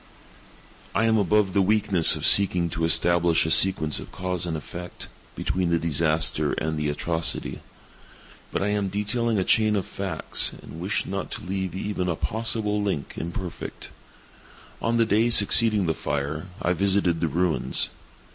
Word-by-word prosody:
I 115 +4 +2
am 110 -1 +3
above 105 -1 +2
the 100 - +3
weakness 100 -3 +3
of - - -4
seeking 90 -4 +4
to 80 0 -1
establish 85 0 +3
a 80 - 0
sequence 80 -6 +3
of - - -10
cause 90 -1 -2
and 80 -2 -2
effect, 85 +4 -8 0.3
between 90 -2 -1
the 85 - +2
disaster 80 -1 +1
and 80 0 -2
the 75 -1 -1
atrocity. 80 +2 -2 0.9
But - - -1
I 105 - 0
am 105 -1 -1
detailing 105 +3 -1
a 95 - +1
chain 110 +2 +3
of 100 - -1
facts—and 95 -5 -1
wish - - -2
not - - -4
to - - -7
leave 95 0 -3
even 95 -2 -3
a 85 - 0
possible 110 +1 -1
link 95 -8 -3
imperfect. 85 +1 -6 0.9
On 115 +1 0
the 115 - +3
day 110 +2 +2
succeeding 110 -2 +4
the 80 - +1
fire, 75 +4 -3
I 90 - +1
visited 95 -2 +1
the 85 - +1
ruins. 85 +2 +1
90 Hz, 155 wpm, -24 LUFS, 85-105 Hz, 0.9 s, seeking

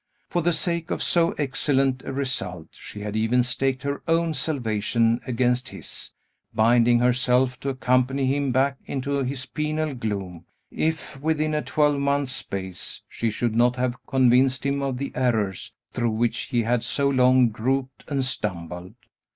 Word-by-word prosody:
For 175 - +1
the 175 +2 +2
sake 170 0 0
of - - -1
so 170 -1 +3
excellent 135 -2 +1
a - - -4
result; 100 - -3
she 105 - -10
had 105 0 -4
even 115 +3 +2
staked 130 +1 0
her 140 0 -2
own 165 0 +2
salvation 115 -5 0
against 125 +1 +1
his, - - -7 0.4
binding 120 +2 +5
herself 125 +1 +2
to 140 - -3
accompany 130 +1 +1
him 140 0 +1
back 135 +2 +2
into 140 +1 -2
his 130 0 -3
penal 155 -1 -2
gloom, 100 -8 -4 0.3
if, 160 -3 -2
within 155 0 0
a 150 - +1
twelvemonth's 140 -3 +1
space, 95 -7 -5
she 115 - -2
should 115 +1 -1
not 120 +2 +3
have 125 -1 -2
convinced 130 0 +3
him 140 0 0
of 135 -2 -2
the 140 +2 -4
errors 110 -7 0 0.2
through 120 -1 0
which 115 +2 0
he 120 -3 0
had 120 +1 +1
so 140 +4 0
long 130 -2 +4
groped 130 +4 -2
and 135 -3 0
stumbled. 90 -6 -4
130 Hz, 155 wpm, -24 LUFS, 120-140 Hz, 0.4 s, binding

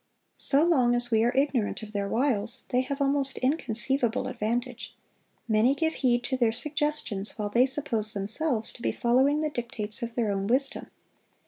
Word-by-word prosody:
So 285 +2 +3
long 255 -8 +3
as 240 0 -1
we 220 0 +3
are 240 - +2
ignorant 265 -6 0
of 215 0 -10
their 200 -1 -2
wiles, 230 -1 +1
they 250 - +2
have 275 +2 -5
almost 275 -1 0
inconceivable 255 -2 -1
advantage; 240 +3 -4 0.5
many 225 +4 +3
give 320 +2 -1
heed 245 -2 +1
to 260 +1 -2
their 235 -3 +2
suggestions 290 -6 -2
while 210 -1 -3
they 240 +5 +3
suppose 235 -6 +1
themselves 220 +4 0
to - - -12
be - - 0
following 265 +5 +2
the 305 -1 -2
dictates 235 -5 -2
of 235 -1 -5
their 225 -4 0
own 195 0 -2
wisdom. 270 +4 0
245 Hz, 175 wpm, -27 LUFS, 220-275 Hz, 0.5 s, So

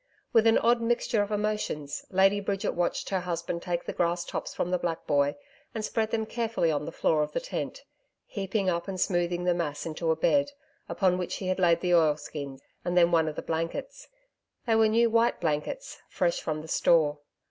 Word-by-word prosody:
With 225 -1 +5
an 225 - +5
odd 235 +1 +3
mixture 230 -2 +1
of 205 - -2
emotions, 210 -9 -2
Lady 195 +2 +4
Bridget 195 -1 -1
watched 175 0 -1
her 190 - 0
husband 170 -1 -3
take 175 -1 -3
the - - -4
grass 175 0 0
tops - - -4
from 180 - -2
the 180 - +1
black 170 -2 -3
boy 145 0 +2 0.4
and 220 -1 -2
spread 220 -1 -1
them 220 -1 -1
carefully 225 -7 0
on 150 -1 -1
the - - -5
floor 155 -1 +1
of 150 - -2
the - - 0
tent, - - -5 0.4
heaping 195 0 -2
up 170 0 0
and 190 -1 -4
smoothing 175 -1 0
the 180 0 +3
mass 160 -4 -3
into 165 +1 -3
a 160 - +3
bed, 285 - +2 0.4
upon 185 -2 +1
which 180 - -3
he 185 -1 -1
laid 175 -3 +3
the 180 -1 +1
oilskin 150 -4 0 0.2
and 175 0 -1
then 175 -1 +5
one 165 -2 +3
of 155 - -3
the - - -5
blankets 165 - -4 0.6
they 225 -2 +2
were 220 0 +5
new 230 +2 +4
white 230 +1 +2
blankets, 160 - -3
fresh - - 0
from 155 0 -3
the - - -10
store. 155 -2 +3
180 Hz, 200 wpm, -28 LUFS, 165-220 Hz, 0.6 s, With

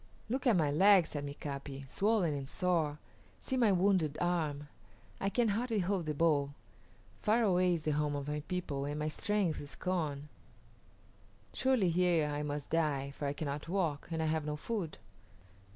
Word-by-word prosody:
"Look 260 +3 -1
at 235 - +5
my 150 -4 +2
leg," 190 +3 +6
said 145 -2 -5
Mika´pi; 140 -1 -6
"swollen 195 - +1
and 135 -1 -5
sore. 165 -5 0 0.4
See 265 - -2
my 235 -5 +4
wounded 185 -5 +2
arm; 155 -5 -1 0.5
I 195 - 0
can 235 +2 +2
hardly 225 +2 0
hold 185 -3 0
the 150 - -1
bow. 145 -3 +2 0.7
Far 225 +2 +3
away 180 -3 +3
is 160 - -5
the 155 - 0
home 150 0 0
of 140 0 -4
my 150 0 -2
people, 160 -7 -2
and 145 +1 -3
my 150 0 -1
strength 200 -1 -1
is 145 0 -8
gone. 150 -6 -2 1.3
Surely 255 -9 +2
here 175 -2 +3
I 145 0 -2
must 145 -1 -4
die, 145 -4 0
for 140 +1 -4
I 140 - -1
cannot 145 +1 -4
walk, 170 -6 -1
and 160 -1 -1
I - - 0
have 155 0 0
no 150 0 -3
food." 185 0 -4
160 Hz, 175 wpm, -33 LUFS, 145-190 Hz, 1.3 s, leg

